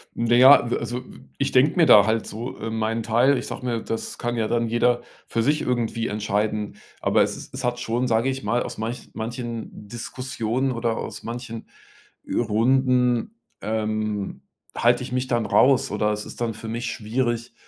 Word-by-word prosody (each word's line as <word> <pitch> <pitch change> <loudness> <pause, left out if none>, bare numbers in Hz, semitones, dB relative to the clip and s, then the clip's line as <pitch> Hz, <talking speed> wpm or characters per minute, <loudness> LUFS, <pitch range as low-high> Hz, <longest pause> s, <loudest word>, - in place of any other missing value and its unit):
Na 120 0 +2
ja, 130 +1 +8
w - - -1
äh, - - +1
also 125 +1 -4
w - - -14 0.2
ich - - 0
denke 135 +4 +4
mir 170 - +6
da 105 -8 +8
halt 110 +1 0
so, 115 +4 -6
äh, 115 - -4
meinen 110 +1 -1
Teil. 120 +5 +3
Ich - - -4
sage 125 - -6
mir, 115 -2 -1
das 115 - -5
kann 120 0 -2
ja 110 -1 0
dann 115 0 0
jeder 120 +1 +2 0.3
für 115 - 0
sich 150 +5 +2
irgendwie 115 -2 -1
entscheiden. 105 0 -2 0.2
Aber - - +2
es - - 0
ist - - -11
es 130 0 -5
hat 125 0 -1
schon, 120 +1 -1
sage 115 +2 +2
ich 135 0 -3
mal 120 +4 +1
aus - - -7
manch 115 +3 -5
manchen 115 0 -5 0.2
Diskussionen 125 +2 -3
oder 115 -2 -1
aus - - -6
manchen 115 -1 -6 0.7
Runden, 125 - +2 0.3
ähm, 110 -1 -2 0.3
halte 120 +1 +3
ich 125 - -7
mich 125 +1 -1
dann 120 -3 0
raus 135 +3 +4
oder 105 +1 +1
es 105 0 -3
ist - - -10
dann 115 -1 0
für 110 +1 -9
mich 115 +2 -3
schwierig, 120 +1 -2
120 Hz, 195 wpm, -24 LUFS, 110-125 Hz, 0.7 s, ja